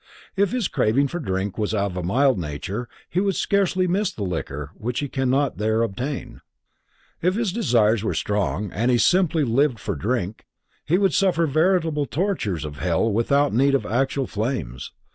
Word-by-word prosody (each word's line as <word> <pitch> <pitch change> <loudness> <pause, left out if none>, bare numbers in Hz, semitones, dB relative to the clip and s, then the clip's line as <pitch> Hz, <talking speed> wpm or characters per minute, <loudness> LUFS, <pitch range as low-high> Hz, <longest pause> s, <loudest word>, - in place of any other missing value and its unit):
If 200 0 +2
his 245 -5 0
craving 135 +6 +1
for 175 - -4
drink 95 - -3
was 105 0 0
of 100 -3 -1
a 90 - -2
mild 125 +6 +2
nature, 90 +9 -5 0.2
he 175 - -1
would 195 -1 +1
scarcely 190 -2 +1
miss 190 +3 0
the 110 - -6
liquor 75 -5 -4
which 120 +4 -4
he 145 - -2
cannot 135 0 0
there 110 +1 +1
obtain. 125 +6 -4 0.8
If 180 +3 +2
his 220 -5 -1
desires 115 - +2
were - - -1
strong 105 -1 -1
and 115 +6 0
he 125 - +4
simply 170 +2 +3
lived 130 +1 +2
for - - -3
drink, 100 - -3 0.4
he 170 +4 +2
would 195 -4 +2
suffer 180 -4 +2
veritable 160 -1 +1
tortures 130 - -1
of 75 -1 -7
hell 90 +7 +1
without 140 +5 +2
need 140 +4 +3
of 140 - 0
actual 135 +3 0
flames. 105 - -4
125 Hz, 175 wpm, -23 LUFS, 105-165 Hz, 0.8 s, he